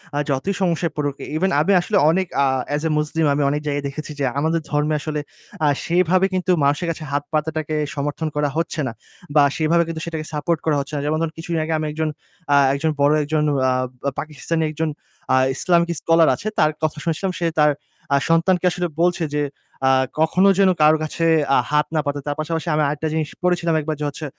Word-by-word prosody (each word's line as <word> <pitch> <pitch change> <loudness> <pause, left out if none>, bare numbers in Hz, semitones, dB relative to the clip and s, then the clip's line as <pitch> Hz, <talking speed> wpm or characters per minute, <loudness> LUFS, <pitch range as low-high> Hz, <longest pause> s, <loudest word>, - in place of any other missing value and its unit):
আ - - -1
যতই 140 +9 0
সমস্যায় 170 -3 0
পড়ুক 145 -2 -2 0.2
ইভেন 190 +3 +1
আমি 165 +7 +2
আসলে 205 +3 0
অনেক 185 +2 +1 0.2
আ - - +4 0.3
as 150 - -2
a - - 0
muslim 150 +1 0
আমি 145 - 0
অনেক 150 +1 -1
জায়গায় 145 0 -1
দেখেছি 155 +2 -6
যে - - 0 0.2
আমাদের 160 +2 0
ধর্মে 150 +1 +1
আসলে 150 -1 -3 0.5
আ - - +4 0.2
সেভাবে 180 +2 +3
কিন্তু 185 0 0
মানুষের 145 +5 +1
কাছে 160 -1 -7
হাত 145 0 0
পাতাটাকে 155 0 -1 0.2
সমর্থন 145 +3 -2
করা 145 -1 +1
হচ্ছে 165 -1 -2
না - - -3 0.4
বা 145 - +7
সেভাবে 165 +2 +3
কিন্তু 160 -1 -5
সেটাকে 160 -2 -4
সাপোর্ট 155 +2 0
করা 155 - +2
হচ্ছে 140 +2 -6
না। 140 - -1
যেমন 155 +1 0
ধরুন 160 -1 -2
কিছুদিন 165 -1 -3
আগে 160 +1 -2
আমি 155 - -2
একজন 155 0 -1 0.4
আ - - +6 0.2
একজন 155 +3 0
বড় 145 +1 +5
একজন 150 +1 0 0.3
আ - - +2 0.3
ব - - -8
পাকিস্তানি 155 +2 -3
একজন 160 +1 -2 0.4
আ - - +6 0.2
ইসলামিক 170 0 +2
স্কলার 165 -1 +4
আছে। 210 - -7
তার 155 0 +4
কথা 155 -1 0
শুনেছিলাম। 170 +3 -1
সে 170 - -1
তার 150 0 +5 0.4
আ - - +5
সন্তানকে 175 +2 +3
আসলে 180 0 -2
বলছে 175 -1 +2
যে 145 - +1 0.4
আ - - +5 0.3
"কখনো 180 +5 +3
যেন 195 -1 +5
কারো 155 +1 +6
কাছে 160 +2 -2 0.3
আ - - +5
হাত 150 0 +3
না - - +3
পাতে।" 145 0 -2
তার 145 - -1
পাশাপাশি 160 +2 -3
আমি 155 - +2
আরেকটা 150 +2 -2
জিনিস 155 -1 -1
পড়েছিলাম 175 -2 +1
একবার 155 +1 -3
যে 150 - -2
হচ্ছে 155 +2 -7
155 Hz, 210 wpm, -21 LUFS, 150-170 Hz, 0.5 s, বা